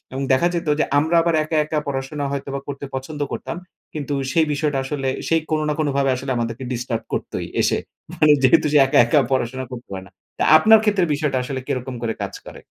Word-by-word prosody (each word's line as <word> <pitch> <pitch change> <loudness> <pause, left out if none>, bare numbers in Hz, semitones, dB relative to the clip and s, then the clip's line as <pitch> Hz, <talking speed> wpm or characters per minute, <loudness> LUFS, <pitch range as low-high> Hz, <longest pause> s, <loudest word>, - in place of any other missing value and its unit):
এবং 135 +1 -3
দেখা 170 +7 +3
যেতো 170 -3 -1
যে - - +3
আমরা 160 +3 +1
আবার 170 -1 +1
একা, 155 +1 -2
একা 155 0 -2
পড়াশোনা 140 +1 -3
হয়তোবা 140 0 -4
করতে 140 0 -5
পছন্দ 145 +3 -5
করতাম - - -5 0.4
কিন্তু 145 -1 -3 0.2
সেই 160 -1 +3
বিষয়টা 145 -1 -1
আসলে 135 -1 -3 0.2
সেই 165 0 +3
কোনো 155 -1 +1
না 150 - 0
কোনোভাবে 140 -2 +1
আসলে 135 +1 -5
আমাদেরকে 115 +2 -3
ডিস্টার্ব 120 -2 -3
করতোই - - -3 0.2
এসে। - - +1 0.3
মানে 150 -1 +4
যেহেতু 130 +2 +5
সে 150 - +6
একা, - - +2
একা 130 +5 +3
পড়াশোনা 130 0 -1
করতে 125 0 -8
পায় 95 -1 -6
না। 95 - -17 0.3
তা - - +1
আপনার 220 +6 +7
ক্ষেত্রে 205 -4 +2
বিষয়টা 145 -3 -1
আসলে 130 +1 -4
কিরকম 125 0 -3
করে 115 -1 -1
কাজ - - -5
করে? - - -10
140 Hz, 205 wpm, -21 LUFS, 130-155 Hz, 0.4 s, আপনার